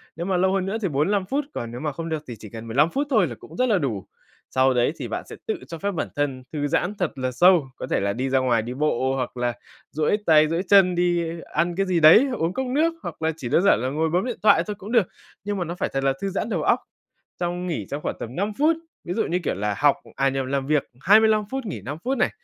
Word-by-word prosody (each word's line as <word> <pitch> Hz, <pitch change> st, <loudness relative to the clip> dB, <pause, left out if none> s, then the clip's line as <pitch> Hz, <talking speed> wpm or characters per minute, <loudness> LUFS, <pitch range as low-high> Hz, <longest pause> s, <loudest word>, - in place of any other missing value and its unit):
nhưng 170 Hz, +2 st, -4 dB
mà 190 Hz, -2 st, +1 dB
lâu 190 Hz, +1 st, +2 dB
hơn 195 Hz, -1 st, 0 dB
nữa 195 Hz, +3 st, -2 dB
thì 195 Hz, -, 0 dB
45 180 Hz, +6 st, +1 dB
phút, 275 Hz, +8 st, -1 dB
còn 115 Hz, -1 st, -5 dB
nếu 120 Hz, -, -6 dB
mà 150 Hz, +2 st, -2 dB
không 165 Hz, +4 st, -6 dB
được 155 Hz, -2 st, -3 dB
thì 120 Hz, -, -6 dB
chỉ 105 Hz, -, -10 dB
cần 115 Hz, +2 st, -9 dB
15 140 Hz, +8 st, +3 dB
phút 280 Hz, +9 st, -2 dB
thôi 215 Hz, -, +3 dB
là 120 Hz, -, -7 dB
cũng 160 Hz, -, -13 dB
rất 255 Hz, -, +3 dB
là 210 Hz, -, +4 dB
đủ. 120 Hz, -, -2 dB, 0.5 s
Sau 130 Hz, 0 st, +3 dB
đấy 125 Hz, +4 st, +2 dB
thì -, -, -4 dB
bạn -, -, -4 dB
sẽ -, -, -9 dB
tự 440 Hz, -, 0 dB
cho 165 Hz, -, -7 dB
phép 200 Hz, +5 st, -2 dB
bản 175 Hz, -, -2 dB
thân 135 Hz, -3 st, -2 dB
thư 145 Hz, -2 st, -1 dB
giãn 175 Hz, +7 st, 0 dB
thật 180 Hz, -4 st, 0 dB
là 130 Hz, -1 st, -2 dB
sâu, 170 Hz, +1 st, +4 dB
có -, -, -6 dB
thể -, -, +1 dB
là 100 Hz, 0 st, 0 dB
đi 130 Hz, +5 st, -2 dB
ra 135 Hz, 0 st, +3 dB
ngoài 120 Hz, -3 st, +2 dB
đi 120 Hz, +3 st, -5 dB
bộ 135 Hz, -2 st, 0 dB
hoặc 125 Hz, -1 st, -4 dB
là 120 Hz, 0 st, 0 dB, 0.4 s
duỗi 155 Hz, +7 st, +1 dB
tay, 155 Hz, -1 st, +6 dB
duỗi 165 Hz, +2 st, 0 dB
chân, 190 Hz, -3 st, +6 dB
đi 175 Hz, -1 st, +1 dB, 0.3 s
ăn 170 Hz, +2 st, +1 dB
cái 195 Hz, +2 st, +1 dB
gì 180 Hz, -3 st, +1 dB
đấy, 165 Hz, -, +8 dB
uống 165 Hz, +1 st, -1 dB
cốc 265 Hz, +5 st, -2 dB
nước, 310 Hz, +6 st, +1 dB
hoặc -, -, -7 dB
là 160 Hz, 0 st, +1 dB
chỉ 125 Hz, -7 st, -5 dB
đơn 165 Hz, -, +3 dB
giản 200 Hz, -, +5 dB
là 130 Hz, -, -1 dB
ngồi 160 Hz, +4 st, 0 dB
bấm 180 Hz, +6 st, +1 dB
điện 245 Hz, -2 st, -3 dB
thoại 185 Hz, -6 st, +5 dB
thôi 210 Hz, -, -3 dB
cũng 205 Hz, +3 st, -8 dB
được. 230 Hz, -7 st, +3 dB, 0.4 s
Nhưng 205 Hz, 0 st, -2 dB
mà 180 Hz, -, -1 dB
nó 170 Hz, +2 st, -5 dB
phải -, -, -2 dB
thật 135 Hz, 0 st, -1 dB
là 135 Hz, 0 st, +2 dB
thư 195 Hz, -, -1 dB
giãn 195 Hz, +3 st, -3 dB
đầu 175 Hz, -8 st, -1 dB
óc -, -, +3 dB, 0.6 s
trong 175 Hz, +1 st, -2 dB
nghỉ 170 Hz, -4 st, -3 dB
trong 145 Hz, +2 st, -4 dB
khoảng -, -, -3 dB
tầm 120 Hz, +2 st, -7 dB
5 205 Hz, +3 st, -1 dB
phút. 315 Hz, +3 st, +3 dB, 0.3 s
Ví 175 Hz, -, -3 dB
dụ 225 Hz, -, +1 dB
như 175 Hz, -, 0 dB
kiểu -, -, 0 dB
là 105 Hz, +2 st, -2 dB
học 145 Hz, -1 st, +4 dB, 0.2 s
à 135 Hz, -, +2 dB
nhầm 135 Hz, -1 st, -2 dB
làm 135 Hz, 0 st, -1 dB
việc 150 Hz, -1 st, +2 dB, 0.2 s
25 215 Hz, +5 st, +5 dB
phút 265 Hz, -1 st, -3 dB
nghỉ 175 Hz, -, -5 dB
5 140 Hz, +8 st, -6 dB
phút 265 Hz, +1 st, 0 dB
này, -, -, +2 dB
165 Hz, 285 wpm, -24 LUFS, 135-195 Hz, 0.6 s, đấy